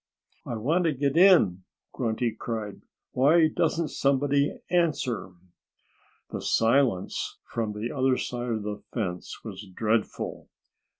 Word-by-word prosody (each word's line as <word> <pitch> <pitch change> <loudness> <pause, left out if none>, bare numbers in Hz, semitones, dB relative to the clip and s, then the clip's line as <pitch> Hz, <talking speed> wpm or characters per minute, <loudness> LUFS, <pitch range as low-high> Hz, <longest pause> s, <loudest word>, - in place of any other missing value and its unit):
"I 120 - -3
want 155 +11 +1
to 160 - +2
get 140 +1 0
in!" 165 - +6 0.3
Grunty 115 0 -1
cried. 110 -2 -5 0.3
"Why 155 +5 +5
doesn't 160 0 0
somebody 140 +1 +1
answer?" 145 - 0 1.0
The - - -4
silence 115 -4 +1
from 110 -2 -3
the 105 +3 -4
other 130 -1 +2
side 120 0 -3
of 110 -2 -2
the 105 0 -5
fence 90 -7 -4
was 105 -2 -7
dreadful. 105 +3 -2
120 Hz, 120 wpm, -27 LUFS, 110-145 Hz, 1.0 s, in